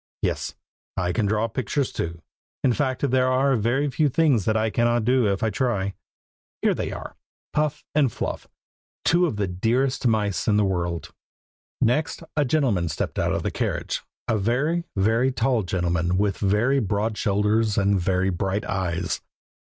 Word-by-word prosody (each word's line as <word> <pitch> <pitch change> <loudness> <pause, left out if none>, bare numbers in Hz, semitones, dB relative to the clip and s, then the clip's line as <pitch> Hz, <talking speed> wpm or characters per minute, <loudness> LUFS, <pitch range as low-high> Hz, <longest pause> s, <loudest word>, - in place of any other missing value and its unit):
Yes, - - -1 0.4
I 90 -1 0
can 105 +4 +1
draw 110 +2 +1
pictures 130 +4 -1
too; 85 0 -4 0.4
in 125 - +4
fact, 135 0 0
there 130 0 +3
are 130 +1 +3
very 120 +6 +1
few 150 +3 +2
things 135 - +2
that 110 0 +2
I 110 0 +1
cannot 120 0 +2
do 125 -2 +3
if 100 - -2
I 110 - +2
try. 105 -7 0 0.7
Here - - +4
they - - -3
are, - - -7 0.4
Puff 150 0 0
and 145 -5 +3
Fluff, - - -4 0.6
two 175 +1 +4
of 145 - -3
the 105 -1 0
dearest 120 +8 0
mice 105 -4 0
in 105 -2 +4
the 105 - +3
world. 85 -3 -2 0.7
Next 150 +7 +1
a 150 -2 +2
gentleman 120 - +1
stepped 75 - -3
out - - +1
of - - -1
the - - -1
carriage; - - -2 0.3
a 110 - +1
very, 145 - 0
very 115 +6 +2
tall 120 0 +1
gentleman, 90 -1 0
with 100 -1 0
very 110 +8 +2
broad 105 0 -1
shoulders, 105 +1 +1
and 100 -2 +2
very 95 +1 +1
bright 95 +3 -1
eyes. 90 -3 -2
110 Hz, 165 wpm, -24 LUFS, 95-130 Hz, 0.7 s, in